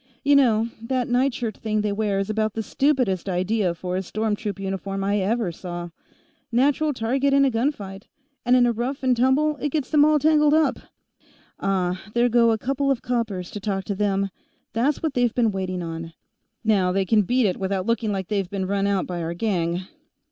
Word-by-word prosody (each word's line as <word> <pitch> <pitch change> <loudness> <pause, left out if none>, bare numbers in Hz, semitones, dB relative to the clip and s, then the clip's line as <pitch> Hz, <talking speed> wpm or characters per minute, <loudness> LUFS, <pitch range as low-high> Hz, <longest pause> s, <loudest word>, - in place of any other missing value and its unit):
"You 285 +1 +4
know, 230 -5 +4
that 250 +1 -1
nightshirt 245 -3 0
thing 215 -1 -1
they 210 0 -1
wear 205 -1 0
is 195 0 -1
about 215 0 -1
the 220 - -2
stupidest 250 - 0
idea 185 0 0
for 180 +1 -4
a 185 - 0
storm 215 +3 -1
troop 205 -2 -5
uniform 195 0 -3
I 200 +1 +1
ever 205 0 0
saw. 175 0 -7 0.6
Natural 285 +5 +2
target 270 +3 +1
in 275 0 +5
a 270 - +2
gunfight, 215 -6 -3 0.4
and 245 0 +4
in 250 -1 +5
a 240 - +3
rough 245 +5 -3
and 255 -1 +3
tumble 275 +5 +2
it 295 - -2
gets 290 -2 -2
them 300 -2 +5
all 305 0 +5
tangled 300 0 +4
up. 315 0 +2 0.8
Ah, 185 -2 0
there 240 +1 +3
go 235 0 +4
a 225 - +2
couple 275 +4 -1
of 270 -3 0
coppers 225 -7 -2
to 210 - -5
talk 195 -1 -2
to 200 - -3
them; 195 -1 0 0.4
that's 265 +8 0
what 315 -3 0
they've 245 -2 +1
been 230 -3 +2
waiting 185 -2 -3
on. 165 0 -6 0.5
Now 200 -5 +2
they 190 +1 +1
can 215 +2 +4
beat 245 +5 +1
it 185 - 0
without 190 -1 -2
looking 230 -1 0
like 190 -3 -3
they 205 -2 0
been 190 0 -4
run 200 +1 0
out 200 -2 +1
by 175 -1 -4
our 165 +1 -3
gang." 175 -3 -1
215 Hz, 205 wpm, -23 LUFS, 195-250 Hz, 0.8 s, in